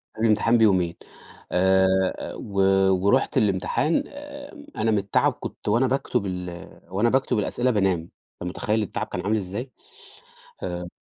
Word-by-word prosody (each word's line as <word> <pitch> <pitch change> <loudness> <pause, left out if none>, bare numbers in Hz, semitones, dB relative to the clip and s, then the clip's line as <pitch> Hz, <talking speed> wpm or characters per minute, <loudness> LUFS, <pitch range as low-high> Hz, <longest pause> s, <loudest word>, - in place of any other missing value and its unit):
قبل 110 - -4
الامتحان 115 +2 +3
بيومين 95 -6 +3 0.6
آآ، 95 +1 +4 0.3
أ - - -6
و 100 -1 -5 0.5
ورُحت 100 - +2
الامتحان 105 - +1
آمم، 290 +1 -10
أنا 115 - +1
من 105 - +2
التعب 100 0 +1
كنت - - -9
وأنا 120 +5 +3
باكتُب 125 -4 -1
ال 90 -2 -6 0.2
وأنا 100 +6 +1
باكتُب 130 -3 +1
الأسئلة 120 +4 0
بانام، 95 -5 +2 0.4
أنت 90 - -3
متخيل 105 +4 -1
التعب 100 - -4
كان - - -4
عامل 105 +2 0
إزاي؟ 105 +7 -5 0.9
آآ 90 0 -4
105 Hz, 145 wpm, -24 LUFS, 95-120 Hz, 0.9 s, آآ